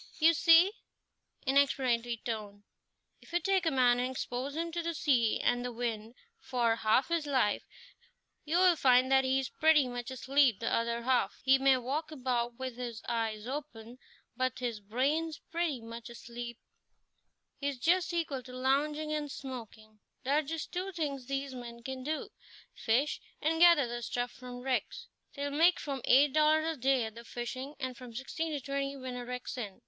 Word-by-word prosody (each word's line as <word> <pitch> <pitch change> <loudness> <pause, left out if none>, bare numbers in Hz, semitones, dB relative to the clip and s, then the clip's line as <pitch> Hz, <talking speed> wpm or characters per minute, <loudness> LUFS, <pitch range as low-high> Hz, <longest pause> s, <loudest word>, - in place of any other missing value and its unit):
"You 330 +1 +5
see" 330 +4 +6 0.7
in 270 +1 +2
explanatory 240 -4 +2
tone 210 -3 -5 0.6
"if - - -17
you 345 - +2
take 380 -2 +1
a - - +5
man 250 -2 +4
and 250 +1 0
expose 260 +2 -4
him 335 +1 -2
to 340 +1 -2
the 335 0 -3
sea 250 -8 +2
and 245 0 +1
the 245 - -3
wind 230 -1 -4 0.2
for 235 - 0
half 225 +6 +2
his 335 -3 0
life, 260 -7 +1 0.8
you'll 350 +3 +4
find 255 -1 +4
that 265 0 +5
he 260 0 +2
is 265 - -3
pretty 310 -4 +4
much 245 0 -5
asleep 260 -3 +2
the 230 - -1
other 235 0 0
half. 255 0 +1
He 270 0 +5
may 270 -1 +5
walk 280 +6 -3
about 245 -4 -2
with 260 -2 -5
his 240 -3 -6
eyes 225 -2 -2
open, 250 -3 -7 0.4
but 255 -1 -1
his 240 -4 -3
brain's 280 +10 -1
pretty 330 -7 -1
much 230 +1 -9
asleep; 235 0 -8 1.0
he's 280 -1 -2
just 355 +8 +2
equal 325 -6 -2
to 250 0 -12
lounging 295 +4 0
and 300 -1 -2
smoking. 225 -5 -9 0.2
There 275 +3 +1
are - - +1
just 315 +2 -5
two 370 +2 -3
things 285 -7 -3
these 275 0 -3
men 235 -2 -9
can 265 +1 -5
do 305 +3 -3 0.4
fish, 260 +7 0 0.2
and 325 +1 0
gather 340 -5 +7
the 240 0 -5
stuff 245 +1 -2
from 250 -1 -9
wrecks. 260 0 -2 0.3
They'll 285 0 -3
make 330 +4 +4
from 275 -3 -4
eight 275 +2 +5
dollars 310 0 +4
a 325 0 -1
day 265 -1 +2
at 220 -1 -5
the 235 +1 -10
fishing, 255 +4 -6
and 260 -2 -4
from 245 -2 -11
sixteen 320 +6 -3
to 290 - -1
twenty 275 +1 -3
when 255 -1 -6
a 245 - -5
wreck's 250 0 -5
in. 205 -5 -6
260 Hz, 180 wpm, -31 LUFS, 240-300 Hz, 1.0 s, gather